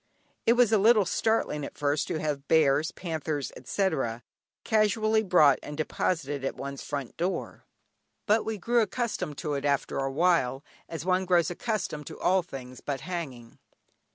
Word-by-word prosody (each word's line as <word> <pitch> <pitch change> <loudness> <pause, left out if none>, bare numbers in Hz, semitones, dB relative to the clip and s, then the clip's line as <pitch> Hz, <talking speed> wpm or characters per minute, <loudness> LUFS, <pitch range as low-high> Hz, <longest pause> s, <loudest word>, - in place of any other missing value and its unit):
It 230 - +7
was 245 -2 +4
a 220 - +4
little 215 0 +5
startling 220 -7 0
at - - -7
first 145 0 0
to - - -2
have 145 -3 -3
bears, 155 0 +4
panthers, 155 -5 -3
etc., 130 - -1 0.4
casually 215 0 +2
brought 175 -9 +5
and 150 - -8
deposited 150 -3 -1
at 135 - -2
one's 140 0 -6
front 140 -4 -5
door, 180 +3 -3 0.6
but 220 +1 +3
we 220 -1 -3
grew 235 +4 +2
accustomed 220 - -2
to 150 -3 -3
it 140 -1 -2
after 140 -1 0
a 135 0 -1
while, 145 -4 +2 0.3
as 165 -1 -5
one 185 0 +2
grows 175 -2 +3
accustomed 175 - -3
to - - -9
all 185 +1 +3
things 130 -6 -9
but 140 -2 -3
hanging. 140 -10 -6
160 Hz, 160 wpm, -28 LUFS, 140-200 Hz, 0.6 s, It